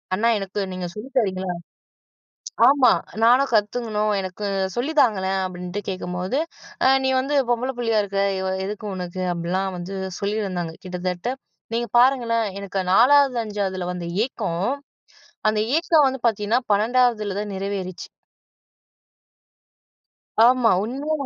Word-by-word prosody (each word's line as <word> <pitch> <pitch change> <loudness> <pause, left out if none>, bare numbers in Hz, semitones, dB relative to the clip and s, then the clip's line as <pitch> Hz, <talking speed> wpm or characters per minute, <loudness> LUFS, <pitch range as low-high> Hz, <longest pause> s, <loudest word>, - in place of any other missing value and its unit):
அண்ணா 225 +4 +2
எனக்கு 195 +1 -5
நீங்க 185 -1 -4
சொல்லி 215 +6 -8
தரீங்களா. 185 -4 -1 1.2
ஆமா. 275 -2 +5 0.3
நானும் 255 +4 +5
கத்துக்கணும், 215 0 +1
எனக்கு 190 +2 -6 0.3
சொல்லி 270 +7 -1
தாங்களேன். 195 -5 +1
அப்படின்ட்டு 180 +2 -6
கேட்கும்போது, 185 +5 -3 0.5
ஆ - - +6 0.2
நீ 265 - +2
வந்து 285 +2 -1
பொம்பள 245 +2 0
புள்ளையா 230 -3 +2
இருக்க, 195 0 -2 0.2
இவ 190 - -2 0.2
எதுக்கு 210 +2 -6
உனக்கு. 180 0 -5
அப்படிலாம் 185 +3 -2
வந்து 185 +3 -6 0.2
சொல்லியிருந்தாங்க 195 -5 -2
கிட்டத்தட்ட, 180 +6 -3 0.4
நீங்க 235 0 -1
பாருங்களேன் 240 -3 +3
எனக்கு 195 -1 -3
4வது 270 +1 +5
5ஆவதுல 190 -4 -3
வந்த 175 -1 -5 0.2
ஏக்கம். 195 -7 -3 0.8
அந்த 215 0 0 0.2
ஏக்கம் 325 -3 +4
வந்து 265 0 -4
பார்த்தீங்கன்னா, 215 +1 +1
12ஆவதுலதான் 210 -2 +1
நிறைவேறுச்சு. 190 -2 -4 2.4
ஆமா. 245 -1 +5
உண்மையா 280 +7 -2
210 Hz, 115 wpm, -23 LUFS, 185-240 Hz, 2.4 s, ஆ